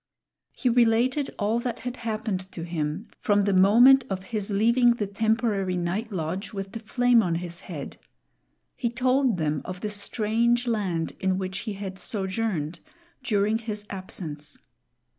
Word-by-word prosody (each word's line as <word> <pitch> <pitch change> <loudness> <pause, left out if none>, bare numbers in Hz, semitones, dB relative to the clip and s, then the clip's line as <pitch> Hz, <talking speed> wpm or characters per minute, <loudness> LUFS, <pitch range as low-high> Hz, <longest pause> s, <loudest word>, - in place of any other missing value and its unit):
He 255 - -3
related 245 +4 +3
all 215 +2 +1
that 240 -1 -4
had 250 0 -5
happened 215 -5 -3
to 165 - -6
him 165 +3 -3
from 205 -1 +2
the 200 0 +1
moment 235 +8 +7
of 190 -1 -3
his 210 0 -2
leaving 235 +4 +4
the 210 - -1
temporary 205 -2 0
night 190 +6 -2
lodge 185 +3 -3
with 195 -1 -5
the 225 - -6
flame 245 +2 +3
on 175 -5 0
his 170 0 -4
head. 155 -6 -7 0.8
He 235 - -1
told 255 -1 +2
them 150 -3 0
of 185 0 -7
the 210 - -2
strange 225 +4 0
land 195 -8 -1
in 190 -1 +1
which 190 0 -3
he - - -2
had 195 -1 -6
sojourned 190 -6 -2 0.4
during 215 -2 +1
his 210 -2 -5
absence. 165 -6 -6
205 Hz, 155 wpm, -26 LUFS, 185-230 Hz, 0.8 s, moment